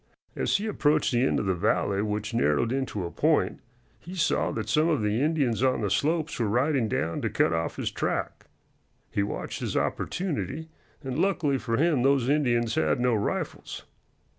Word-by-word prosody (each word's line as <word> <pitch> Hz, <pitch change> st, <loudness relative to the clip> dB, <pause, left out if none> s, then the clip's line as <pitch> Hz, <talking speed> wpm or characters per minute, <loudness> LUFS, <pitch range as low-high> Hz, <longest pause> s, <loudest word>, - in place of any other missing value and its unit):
As -, -, +1 dB
he 205 Hz, -, -4 dB
approached 155 Hz, -8 st, +2 dB
the 120 Hz, -1 st, +2 dB
end -, -, +1 dB
of -, -, -2 dB
the 95 Hz, -, +2 dB
valley, 100 Hz, +3 st, +1 dB
which 105 Hz, +1 st, -2 dB
narrowed 115 Hz, +1 st, +2 dB
into 130 Hz, -8 st, -2 dB
a 85 Hz, -, -5 dB
point, -, -, +1 dB, 0.4 s
he 180 Hz, +3 st, -9 dB
saw 170 Hz, -, +1 dB
that -, -, -3 dB
some 155 Hz, +2 st, +2 dB
of 150 Hz, -9 st, +1 dB
the 105 Hz, +3 st, +1 dB
Indians 145 Hz, -7 st, +1 dB
on 130 Hz, -2 st, +2 dB
the 100 Hz, -3 st, -1 dB
slopes 155 Hz, +10 st, 0 dB
were 115 Hz, -, +1 dB
riding 125 Hz, +3 st, +1 dB
down 85 Hz, -4 st, -1 dB
to -, -, -1 dB
cut -, -, +2 dB
off 80 Hz, 0 st, -2 dB
his -, -, -3 dB
track. -, -, -3 dB, 0.6 s
He -, -, 0 dB
watched 100 Hz, -, -4 dB
his -, -, -2 dB
opportunity, 160 Hz, -, -2 dB, 0.3 s
and 130 Hz, +1 st, -3 dB
luckily 170 Hz, -7 st, +1 dB
for 115 Hz, -2 st, -1 dB
him 155 Hz, -3 st, +2 dB
those 135 Hz, -1 st, +3 dB
Indians 120 Hz, -6 st, +2 dB
had 80 Hz, +4 st, +1 dB
no 125 Hz, 0 st, +2 dB
rifles. 105 Hz, -2 st, -3 dB
125 Hz, 185 wpm, -27 LUFS, 105-150 Hz, 0.6 s, those